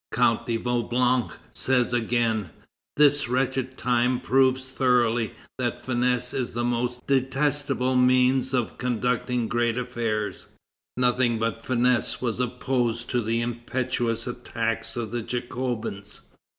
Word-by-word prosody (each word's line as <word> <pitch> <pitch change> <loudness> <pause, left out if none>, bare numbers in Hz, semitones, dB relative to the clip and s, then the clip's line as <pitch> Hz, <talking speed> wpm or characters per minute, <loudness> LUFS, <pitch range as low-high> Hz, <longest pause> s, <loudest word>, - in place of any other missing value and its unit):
Count 115 -1 +2
de 115 -1 0
Vaublanc 120 +1 0
says 125 -2 +1
again: 115 -4 +1 0.5
"This 145 -2 +5
wretched 130 0 -1
time 125 0 +1
proves 130 0 +2
thoroughly 120 -3 +1 0.3
that 120 -1 -2
finesse 125 0 0
is 125 -2 -2
the 120 +1 -2
most 120 +1 -2
detestable 135 -1 +1
means 130 +1 +3
of 125 -3 -1
conducting 125 -1 0
great 120 0 0
affairs. 115 -4 -3 0.5
Nothing 125 -1 +2
but 115 0 -2
finesse 125 -1 +1
was 120 -1 -2
opposed 125 -1 -1
to 125 - +1
the 115 +1 0
impetuous 120 -1 -2
attacks 115 -2 -3
of 115 -3 -3
the 120 0 -2
Jacobins. 120 -4 -4
125 Hz, 120 wpm, -25 LUFS, 120-130 Hz, 0.5 s, This